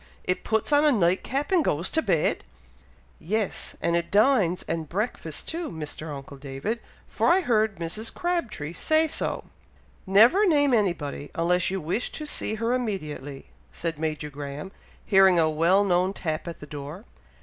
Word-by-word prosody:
it 180 - -1
puts 220 +6 0
on 290 +1 +5
a 300 - +5
night 185 -6 +2
cap, 280 +5 -2
and 360 -4 +4
goes 170 - 0
to 320 - +1
bed?" 175 - +1 0.8
"Yes! 210 +4 -2
and 170 - +2
it 170 0 0
dines 205 -5 +3
and 160 -2 -3
breakfasts 180 -6 -3
too, 330 0 -4
Mr. 155 -1 -6
uncle 140 0 -8
David, 140 - -4 0.3
for - - +1
I 365 +3 +5
heard 220 - +2
Mrs. 175 +7 -4
Crabtree 330 - -2
say 315 - +2
so." - - -3 0.6
"Never 230 - +6
name 290 -5 +4
anybody, 170 - 0
unless 175 +2 +2
you 190 +1 -2
wish 175 +9 -2
to 305 - -5
see 220 -6 -2
her 230 +2 0
immediately," 155 - -4 0.2
said 165 -3 -4
Major 155 -1 -3
Graham, 145 +5 -7 0.3
hearing 190 -3 +6
a 160 -1 +3
well 170 +6 +4
known 185 0 +2
tap 160 -3 -3
at 170 - -7
the - - -7
door. 150 +7 -8
185 Hz, 165 wpm, -26 LUFS, 155-230 Hz, 0.8 s, Never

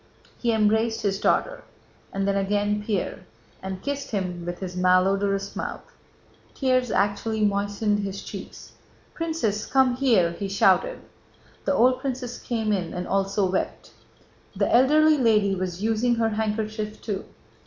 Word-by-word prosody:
He 235 - +1
embraced 220 +1 +2
his 195 -1 0
daughter, - - +1 0.5
and 195 0 -1
then 200 - +1
again 205 +1 0
Pierre, 210 -3 -2 0.4
and 190 -1 -6
kissed 280 -1 -3
him 180 -4 -3
with 175 0 -3
his 180 -2 -6
malodorous 195 +2 +2
mouth. - - -6 0.6
Tears 255 -2 +1
actually 210 +2 0
moistened 205 +1 0
his 195 -1 -4
cheeks. - - -9 0.4
"Princess, 315 - -2
come 260 -2 +3
here!" 225 -11 +3
he 195 +3 -5
shouted. - - +2 0.6
The - - +2
old 255 +2 +4
princess 255 -2 -4
came 220 -3 -2
in 180 -4 -2
and 180 0 -4
also 195 +1 +1
wept. 190 - -3 0.6
The - - +2
elderly 305 +4 +5
lady 210 -5 +3
was 185 0 -3
using 225 +2 +2
her 225 -1 +1
handkerchief 215 0 -3
too. 205 -3 -4
210 Hz, 140 wpm, -25 LUFS, 195-240 Hz, 0.6 s, elderly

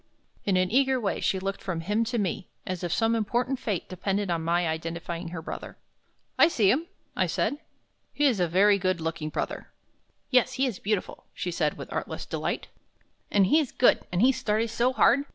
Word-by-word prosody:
In 195 -2 +2
an 185 +1 +1
eager 265 +1 +3
way 205 -4 -1
she 190 - +1
looked 195 +1 -3
from 175 -4 -3
him 210 +7 +1
to 240 +2 -2
me, 195 -2 -2 0.2
as 185 -1 -4
if 175 - -2
some 225 +6 +2
important 240 +4 0
fate 200 -6 -2
depended 195 +1 -2
on 165 -1 0
my 170 +1 +1
identifying 165 +2 -4
her 165 -1 -6
brother. - - -7 0.6
"I - - +8
see 215 - +3
him," 320 +6 0 0.3
I - - +2
said. 290 - -1 0.5
"He 290 - +1
is 250 -8 +3
a 175 - +2
very 200 +4 +4
good 185 -1 0
looking 160 -1 -3
brother." - - -4 0.6
"Yes, 255 0 +4
he 265 +1 +1
is 240 -7 -3
beautiful," 210 -2 -2
she 180 - -3
said, 155 -3 0
with - - -8
artless - - -4
delight, - - -3 0.6
"and 200 -2 +4
he's 300 +6 +3
good, 250 - +4
and 180 +4 +2
he 260 - +7
studies 220 -2 -1
so 240 +2 +2
hard. 250 0 +4
200 Hz, 195 wpm, -27 LUFS, 175-240 Hz, 0.6 s, I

